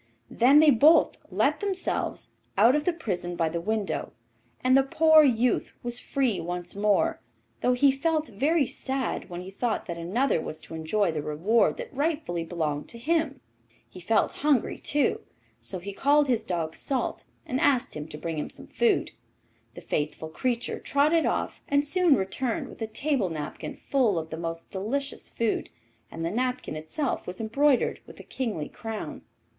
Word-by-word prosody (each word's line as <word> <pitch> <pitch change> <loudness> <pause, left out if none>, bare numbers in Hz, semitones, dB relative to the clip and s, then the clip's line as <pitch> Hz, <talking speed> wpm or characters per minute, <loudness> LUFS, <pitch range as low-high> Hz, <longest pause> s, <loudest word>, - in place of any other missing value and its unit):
Then 260 +5 +5
they 310 -2 +7
both 295 +7 +5
let - - +1
themselves 390 -3 -1 0.3
out 230 +7 +6
of 300 0 0
the 360 - +3
prison 180 - -3
by 165 -2 +1
the 170 +1 -3
window, 215 +1 -2 0.5
and 255 +1 +5
the 270 - +7
poor 315 +3 +6
youth 250 -3 +2
was 240 0 -1
free 255 -10 0
once 175 +1 -4
more, 210 +11 +2 0.4
though 250 - +2
he 270 +2 +5
felt 310 +3 0
very 280 +8 +1
sad 265 -4 -2
when 175 0 -6
he 185 +1 -9
thought 230 +3 -2
that 170 -2 -5
another 195 +4 +1
was 155 - -4
to - - -11
enjoy 165 +4 0
the 155 -2 -3
reward 165 +11 +2
that - - -7
rightfully 290 - -1
belonged 155 -4 -3
to 235 - -8
him. 290 +1 0 0.5
He 150 - -12
felt 215 +5 +2
hungry 285 -5 +2
too, 290 -1 +1 0.4
so 190 - -2
he 195 +3 -7
called 290 +6 +3
his 245 -4 0
dog 165 -3 -2
'Salt,' 270 -2 -2 0.2
and 255 - -2
asked 270 -5 +2
him 150 0 -5
to 150 - -9
bring 160 0 -4
home - - -4
some - - -9
food. - - +1 0.6
The - - -9
faithful 155 +1 -3
creature 240 +8 -2
trotted 305 +3 +2
off, - - -2
and 285 0 +2
soon 345 0 +4
returned 215 +5 -2
with - - -13
a 225 - -1
table 240 -2 0
napkin 150 -2 -5
full 245 -9 +1
of 160 0 -4
the 160 - -4
most 165 0 -5
delicious 265 +9 -3
food, 230 -2 -1 0.4
and 165 0 -5
the 165 - -1
napkin 250 -5 -2
itself 160 - -3
was 180 0 -5
embroidered 260 +5 +2
with - - -13
a - - -9
kingly 215 - -3
crown. 225 -2 -6
230 Hz, 175 wpm, -27 LUFS, 175-280 Hz, 0.6 s, they